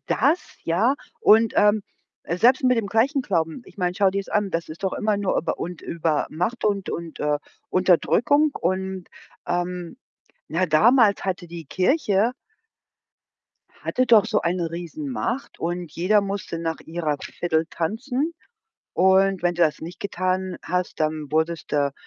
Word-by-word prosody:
das, 340 - +3 0.3
ja, 205 +11 +2 0.3
und, 220 +1 +5
ähm, 210 0 +4 0.4
selbst 245 - +3
mit 250 -1 +4
dem 220 - -1
gleichen 245 +8 +2
Glauben. 170 -1 -1
Ich - - -17
meine, 180 -1 0
schau 200 -2 +4
dir's 195 +1 -3
an, 210 -2 0
das 165 -1 -2
ist 165 +5 -8
doch 190 - 0
immer 210 -1 0
nur 200 -2 0
über - - -1
und 175 -1 -6
über 160 -3 -1
Macht 180 +10 -2
und 200 -2 0
und, 165 -2 -5
äh, 150 0 0 0.3
Unterdrückung. 235 - +3
Und, 185 +1 -2 0.4
ähm 175 +1 -3 0.5
na, 185 +3 +1
damals 210 +6 +4
hatte 185 -2 -2
die 170 -1 -8
Kirche 205 - +1 1.5
hatte 255 0 0
doch 225 -2 +6
so 215 -2 +1
eine 170 -1 -1
Riesenmacht 245 - -4
und 175 -1 -3
jeder 200 +5 +3
musste 195 -4 -4
nach 165 -1 -3
ihrer 160 -3 -2
Fidel 160 -2 -1
tanzen. 250 - -2 0.6
Und 190 0 +4
wenn 175 0 +1
du 175 - +2
das 155 -2 +2
nicht 170 +2 -8
getan 185 -1 -2
hast, 180 -1 -2
dann 155 -1 -1
wurdest 160 +1 -1
du 140 -1 +1
185 Hz, 150 wpm, -23 LUFS, 170-215 Hz, 1.5 s, doch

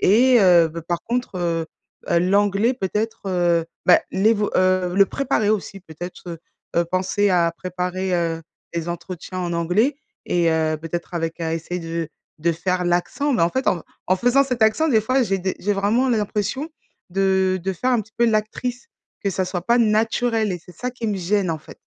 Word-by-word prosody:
et 245 +5 +5
heu, 175 -4 +6
bah 165 +2 -7
par 170 +1 -3
contre, 245 -4 -3
heu, 165 -2 -1 0.4
heu, 170 - +4
l'anglais 200 +5 +2
peut-être 220 +1 -3
heu, 175 -2 +2 0.2
bah 180 - +6
l'évo 210 +2 +2
heu, 185 -1 +2
le 195 0 +5
préparer 250 -5 0
aussi 195 -2 -2
peut-être 175 +1 -9
heu, 170 -1 -6 0.4
heu 170 - +4
penser 190 +3 +1
à 170 -2 +3
préparer, 185 +1 -2
heu, 165 -2 -1 0.3
les 170 0 -3
entretiens 175 +1 -6
en 175 -1 -2
anglais 180 - +1 0.3
et 170 -1 +2
heu 160 -1 +1
peut-être 170 +3 -5
avec 165 0 -3
à 160 -1 -1
essayer 175 +2 -4
de 165 -1 -4 0.3
de 170 +2 +1
faire 180 +2 -1
l'accent. 175 +12 0
Mais 215 - +2
en 170 - +3
fait 260 +5 -2
en 170 - 0 0.2
en 185 - +3
faisant 245 +7 +3
cet 250 -4 -1
accent, 220 +9 +3
des 225 -7 +4
fois 255 +4 +2
j'ai 195 -5 0
des 190 0 -2
j'ai 205 +1 0
vraiment 215 +7 +2
l 235 - +3
l'impression 215 +8 -2 0.4
de 190 0 +1
de 190 - -1
faire 250 +9 -1
un 245 -3 +3
petit 220 +1 -12
peu 235 - +3
l'actrice, 230 - -2 0.3
que 200 - 0
ça 190 0 -1
soit 180 -1 -4
pas 235 +1 +4
naturel 225 0 +2
et 180 - -4
c'est 180 - -14
ça 250 - -3
qui 240 -2 -5
me 205 - -1
gêne, 190 0 0
en 160 - -2
fait. 155 - -14
190 Hz, 200 wpm, -22 LUFS, 175-220 Hz, 0.4 s, heu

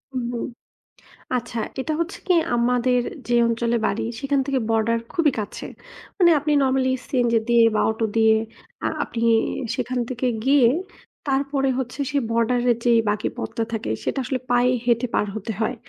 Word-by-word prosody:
উহু। 240 -1 -2 1.0
আচ্ছা 235 -1 -4 0.2
এটা 310 +4 -2
হচ্ছে 335 +3 -3
কি? 365 - +4 0.2
আমাদের 245 +1 +2 0.3
যে 240 - +1
অঞ্চলে 235 0 0
বাড়ি 200 - -1 0.2
সেখান 275 0 +1
থেকে 275 -1 +1
বর্ডার 225 +1 +2
খুবই 330 -5 +2
কাছে। 205 - -6 0.5
মানে 350 -3 +6
আপনি 300 +1 -1
নরমালি 260 -1 +2 0.2
সিএনজি 240 -3 +2
দিয়ে 235 -1 +5
বা 210 - +2
অটো 220 +1 -2
দিয়ে 220 -1 +5 0.5
আ - - +2 0.2
আপনি 230 - -6 0.6
সেখান 255 0 -2
থেকে 255 0 -2 0.2
গিয়ে 270 -3 +5 0.6
তারপরে 275 0 0
হচ্ছে 260 +2 -4
সেই 285 -1 +1
বর্ডারের 240 +1 +2
যে 240 - +3 0.2
বাকি 210 0 -1
পথটা 230 - -3
থাকে 220 - -3
সেটা - - -2
আসলে 255 +1 -2
পায়ে 245 +1 +4
হেঁটে 235 0 +2
পার - - +2
হতে 220 +1 -4
হয়। 225 +3 0
245 Hz, 160 wpm, -23 LUFS, 230-270 Hz, 1.0 s, মানে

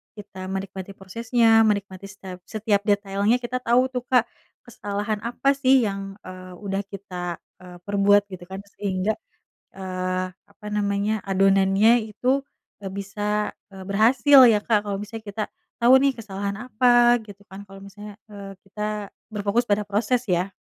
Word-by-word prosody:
kita 195 -3 -9
menikmati 195 0 -6
prosesnya, 230 +5 0 0.2
menikmati 200 -2 -2
setep 190 -2 -10
setiap 215 -2 0
detailnya 205 +2 +2
kita 245 +1 -2
tau 240 +1 +3
tuh 250 -2 -3
Kak, 250 -3 +4 0.4
kesalahan 205 -2 -4
apa 260 +3 0
sih 260 -1 +5
yang, 195 -2 -4
eee, 185 0 -10
udah 195 0 -1
kita, 180 -3 -6 0.2
eee, 180 -1 -12
perbuat, 200 +1 +3
gitu 180 -1 -8
kan. 190 +1 -8 0.2
Sehingga, 195 +1 0 0.6
eee, 185 -1 -3
apa 200 +3 -18
namanya, 205 +1 0
adonannya 195 +4 +4 0.2
itu 270 +4 0 0.3
nggak 195 -2 -7
bisa, 205 +1 -2 0.2
eee, 190 - -9
berhasil 240 +7 +5
ya 220 -3 +5
Kak. 210 -2 +1
Kalau 200 -1 -2
misalnya 220 +1 -8
kita 205 +1 -3 0.4
tau 250 +3 +7
nih 275 0 +2
kesalahan 200 -3 -5
apa, 240 0 +5
gitu 200 -1 -13
kan, 195 +1 -9
kalau 195 0 -13
misalnya, 205 +1 -11 0.2
eee, 200 -1 -9
kita 210 +1 -4 0.2
berfokus 210 +3 0
pada 205 +1 +2
proses 225 +4 0
ya. 180 +2 0
205 Hz, 150 wpm, -23 LUFS, 195-220 Hz, 0.6 s, tau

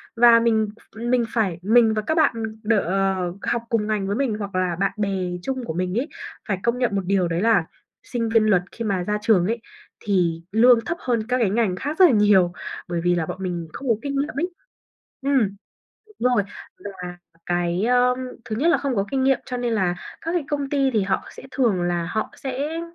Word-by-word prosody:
và 230 0 +7
mình 220 -2 +2 0.2
ph - - -16
mình 245 -1 +3
phải 200 -8 0
mình 225 +3 +4
và 215 - 0
các 315 +9 -1
bạn 315 - +4 0.3
đ 225 +2 +2
ờ, 190 -1 0
học 235 - 0
cùng 215 -2 0
ngành 210 -3 -1
với 200 - -1
mình 255 -3 0
hoặc 200 -2 -5
là 185 -2 0
bạn 195 0 +2
bè 205 -1 0 0.3
chung 260 +4 -3
của 160 - -4
mình 180 +5 -1
ấy, 275 - -2 0.4
phải 195 -4 0
công 235 +1 +1
nhận 240 -5 +1
một 195 - +1
điều 190 -2 +2
đấy 170 +1 -1
là, 215 -6 +3 0.4
sinh 230 -2 -2
viên 225 -1 +4
luật 185 -4 +4
khi 230 - -5
mà 190 -4 0
ra 210 +3 -1
trường 210 -5 +3
ấy, 230 +1 -2 0.4
thì 175 -5 0
lương 235 +3 +6
thấp 335 - -2
hơn 230 -3 -1
các 250 +1 +1
cái 230 -6 +2
ngành 210 -2 +1
khác 290 - -4
rất 375 - +9
là 340 - +6
nhiều, 205 -5 +4 0.3
bởi 170 -1 -2
vì 175 0 +2
là 165 - 0
bọn - - -5
mình 175 -3 -3
không 275 - -7
có 230 - +4
kinh 280 -1 -3
nghiệm 295 +2 -2
ấy. 350 +3 0 0.7
Ừm. 265 -8 +1 0.7
Đúng 250 0 +3
rồi, 205 - +3 0.4
và 180 -3 -7 0.3
cái, 175 +2 0
ơ, 250 +1 +3 0.3
thứ 215 - -4
nhất 295 +9 +2
là 340 - +4
không 275 -4 -2
có 195 - +1
kinh 270 -1 0
nghiệm 270 -1 +3
cho 250 - -3
nên 245 -1 -1
là 185 -5 +1 0.3
các 330 - -3
cái 350 -4 0
công 285 -2 -1
ty 275 -2 +2
thì 215 -3 +2
họ 190 0 -1
sẽ - - -12
thường 230 -11 +1
là 175 -1 -1
họ 215 +5 -2
sẽ 280 +5 -3
220 Hz, 230 wpm, -23 LUFS, 185-250 Hz, 0.7 s, rất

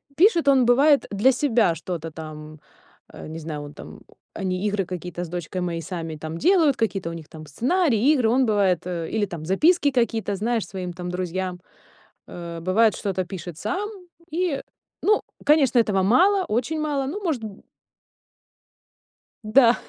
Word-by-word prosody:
пишет 340 -3 +4
он, 265 -3 +5
бывает, 275 +4 +4
для 210 +7 +4
себя 240 - +2
что-то 165 -1 -5
там, 155 -1 -9 0.5
э, - - -9
не 160 +1 -7
знаю, 155 -2 -5
он 145 0 -9
там - - -11 0.4
они 185 +1 -1
игры 200 -2 -1
какие-то 180 -1 -6
с 165 - -7
дочкой 175 +1 -4
мои 170 -2 -2
сами 165 -1 -5
там 160 +2 -6
делают, 325 - +4
какие-то 195 -7 -1
у - - -6
них 165 -2 -9
там 155 -1 -10
сценарии, 260 - +2
игры 250 -7 +2
он 255 +2 +3
бывает, 195 -5 +2
э, 170 -3 -4
или 220 -2 0
там 170 -5 -7
записки 290 - +3
какие-то, 225 -5 0
знаешь, 225 -1 -1
своим 180 -2 -5
там 180 0 -6
друзьям. 180 0 -3 0.7
Э, 170 -1 -7
бывает, 210 +5 +3
что-то 190 -3 -2
пишет 175 -3 -8
сам, 390 - -3 0.4
и 335 -5 0 0.4
ну, 425 +1 +3 0.2
конечно, 285 -5 +4
этого 195 -4 +2
мало, 370 - +4
очень 255 +7 -1
мало, 285 -3 -1
ну, 405 +8 -5
может, 290 -10 -1
м 205 -3 -9 1.8
Да. 235 +2 +5
205 Hz, 165 wpm, -23 LUFS, 175-270 Hz, 1.8 s, он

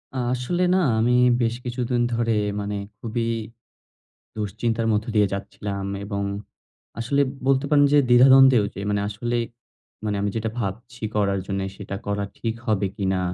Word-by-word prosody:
আসলে 125 +8 -1
না, - - +4 0.2
আমি 120 +2 +3 0.3
বেশ 115 0 +1
কিছুদিন 120 0 -1
ধরে, 115 -1 +1 0.3
মানে 105 0 -3 0.2
খুবই 115 0 -2 1.1
দুশ্চিন্তার 110 +2 -1
মধ্য 105 0 +1
দিয়ে 105 -2 +4
যাচ্ছিলাম 100 0 -4 0.2
এবং 100 -1 -3 0.8
আসলে 125 +5 0 0.3
বলতে 135 0 +3
পারেন 145 -1 +5
যে, 145 - +6
দ্বিধা-দ্বন্দ্বই 130 0 +7
ওইটি 100 - -6
মানে 100 0 +1
আসলে 120 +4 -2 0.7
মানে 105 -1 -1
আমি 100 - 0
যেটা 110 0 -1
ভাবছি 115 +2 -5
করার 100 -2 +1
জন্যে 95 0 -2
সেটা 100 -1 -6
করা 100 0 -1
ঠিক 115 -1 -2
হবে 105 -3 +1
কিনা? 95 -2 0
110 Hz, 145 wpm, -23 LUFS, 100-120 Hz, 1.1 s, দ্বিধা-দ্বন্দ্বই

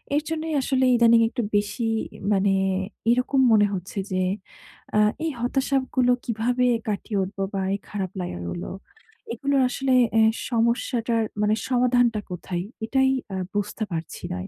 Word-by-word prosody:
এর 295 - +3
জন্যই 320 0 -3
আসলে 260 0 +1
ইদানিং 235 -1 +6
একটু 245 +1 -3
বেশি 210 +3 0 0.4
মানে 195 -1 +3 0.6
এইরকম 250 +3 +2
মনে 210 -2 +5
হচ্ছে 190 +2 -4
যে 185 - 0 0.8
আ - - +5 0.3
এই 320 - 0
হতাশাগুলো 260 0 +1
কিভাবে 245 +2 0 0.2
কাটিয়ে 210 0 -2
উঠব? 195 +2 -7 0.2
বা 195 - -1
এই 200 - -2
খারাপ 195 -3 -3
লাগাগুলো? 85 - -5 0.6
এগুলোর 280 -1 +1
আসলে 265 +1 0 0.2
অ্যা 225 0 +5 0.3
সমস্যাটার 235 0 +1 0.2
মানে 210 +1 +3
সমাধানটা 245 -3 +3
কোথায়? 180 0 -4 0.2
এটাই 265 +3 +2 0.3
আ - - -2 0.2
বুঝতে 205 +2 -2
পারছি 165 -1 -5
না। 90 +1 -5
230 Hz, 135 wpm, -24 LUFS, 200-255 Hz, 0.8 s, ইদানিং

